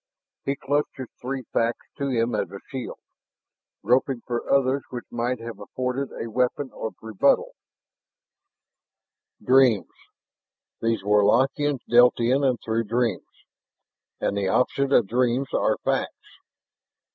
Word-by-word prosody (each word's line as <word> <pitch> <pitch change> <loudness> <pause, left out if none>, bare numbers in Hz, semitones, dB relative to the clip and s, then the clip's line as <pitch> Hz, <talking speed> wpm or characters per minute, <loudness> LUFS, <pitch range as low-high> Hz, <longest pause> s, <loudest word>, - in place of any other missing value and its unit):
He 140 - 0
clutched 145 +2 -1
his 130 -3 -7
three 130 +1 -4
facts 115 +1 0
to 140 -1 -1
him 120 -2 0
as - - -1
a 100 - -8
shield, 130 -3 -6 0.9
groping 125 +3 +2
for 120 -1 -3
others 140 0 +3
which 120 -1 -6
might 120 +2 -1
have 115 0 -8
afforded 130 +2 -3
a 115 - -5
weapon 125 +4 -1
of 110 - -5
rebuttal. 110 -3 +2 1.9
Dreams, 125 -8 +4 0.9
these 115 -2 0
Warlockians 130 +7 +2
dealt 120 +1 +5
in 130 +4 +2
and 130 -3 +2
through 115 +1 0
dreams. 115 -2 -2 0.7
And - - -1
the 100 -1 0
opposite 135 +6 +1
of 120 - +5
dreams 125 +4 0
are - - +2
facts! - - -3
125 Hz, 125 wpm, -25 LUFS, 115-135 Hz, 1.9 s, dealt